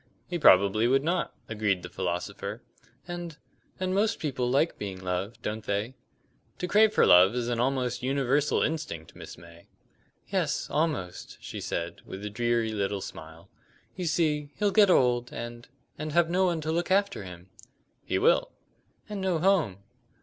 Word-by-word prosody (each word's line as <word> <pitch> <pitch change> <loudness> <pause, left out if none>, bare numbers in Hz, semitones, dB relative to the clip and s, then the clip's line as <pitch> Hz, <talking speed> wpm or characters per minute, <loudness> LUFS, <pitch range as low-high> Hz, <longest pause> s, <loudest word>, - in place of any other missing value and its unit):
"He 175 -1 -4
probably 100 - +5
would 135 +2 +3
not," 170 +3 0 0.2
agreed 105 -4 -1
the - - -5
philosopher. 100 +5 -4 0.4
"And 175 -3 -6 0.4
and 185 0 -1
most 215 +3 +1
people 130 -5 -2
like 140 +6 +1
being 95 -2 -5
loved, 95 +4 -3
don't 110 +1 -3
they?" 105 +5 -2 0.6
"To 180 - -3
crave 210 +4 +5
for - - +4
love 95 +5 +7
is 120 -1 -1
an 120 -1 -1
almost 125 -1 0
universal 135 +2 +1
instinct, 85 - -4
Miss - - -10
May." 85 0 -15 0.6
"Yes, - - -1
almost," 150 - -2
she - - -7
said, 85 0 -4
with 95 +2 -8
a 105 - -4
dreary 120 0 0
little 100 -1 -2
smile. 80 +2 -10 0.5
"You 185 - -4
see, 155 -3 0
he'll 205 -1 +1
get 205 -1 +5
old, 125 -6 +3
and 120 0 -7 0.3
and 155 -1 -4
have 170 0 +3
no 185 +2 +3
one 170 -3 -1
to 155 +1 -2
look 170 +3 -1
after 195 - +1
him." 90 0 -11 0.5
"He - - -1
will." - - +3 0.6
"And 210 -2 -5
no 185 -3 +1
home." 160 - +1
125 Hz, 165 wpm, -28 LUFS, -, 0.6 s, love